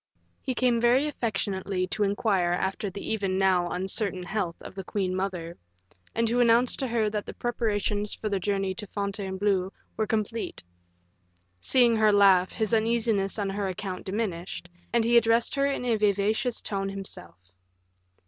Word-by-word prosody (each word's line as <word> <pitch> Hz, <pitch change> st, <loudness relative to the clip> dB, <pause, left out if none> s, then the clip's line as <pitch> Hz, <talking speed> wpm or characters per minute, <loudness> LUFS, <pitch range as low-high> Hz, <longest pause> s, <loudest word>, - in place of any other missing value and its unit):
He 260 Hz, -, -3 dB
came 240 Hz, -2 st, +2 dB
very 250 Hz, +5 st, +4 dB
affectionately 195 Hz, -7 st, -2 dB
to 215 Hz, -, -3 dB
inquire 195 Hz, -3 st, +1 dB
after 190 Hz, +3 st, -2 dB
the 200 Hz, +2 st, -7 dB
even 195 Hz, -3 st, -1 dB
now 185 Hz, -2 st, +2 dB
uncertain 190 Hz, 0 st, -2 dB
health 180 Hz, -3 st, -2 dB
of -, -, -10 dB
the 195 Hz, 0 st, -6 dB
queen 185 Hz, -1 st, -2 dB
mother, 180 Hz, -3 st, -4 dB, 0.6 s
and 230 Hz, 0 st, +2 dB
to 240 Hz, +2 st, +1 dB
announce 240 Hz, +1 st, +4 dB
to 265 Hz, -, -1 dB
her 230 Hz, -2 st, +1 dB
that 210 Hz, -1 st, -3 dB
the -, -, -7 dB
preparations 210 Hz, -3 st, -1 dB
for 220 Hz, -, -4 dB
the 200 Hz, -2 st, 0 dB
journey 195 Hz, 0 st, -1 dB
to 210 Hz, +2 st, -7 dB
Fontainebleau 195 Hz, -1 st, -1 dB, 0.3 s
were 220 Hz, -1 st, 0 dB
complete. 220 Hz, +1 st, -2 dB, 1.0 s
Seeing 240 Hz, -, +4 dB
her 215 Hz, -1 st, +5 dB
laugh, 195 Hz, -3 st, +5 dB
his 220 Hz, 0 st, -1 dB
uneasiness 220 Hz, -3 st, +1 dB
on 200 Hz, -2 st, -1 dB
her 200 Hz, 0 st, -2 dB
account 185 Hz, 0 st, -5 dB
diminished, 190 Hz, -4 st, -4 dB, 0.2 s
and 235 Hz, -1 st, +3 dB
he 235 Hz, +1 st, +4 dB
addressed 230 Hz, 0 st, +3 dB
her 275 Hz, 0 st, +2 dB
in 275 Hz, -3 st, -2 dB
a 235 Hz, -2 st, +2 dB
vivacious 210 Hz, +3 st, +1 dB
tone 195 Hz, -1 st, -1 dB
himself. 190 Hz, -, -7 dB
205 Hz, 160 wpm, -27 LUFS, 190-230 Hz, 1.0 s, her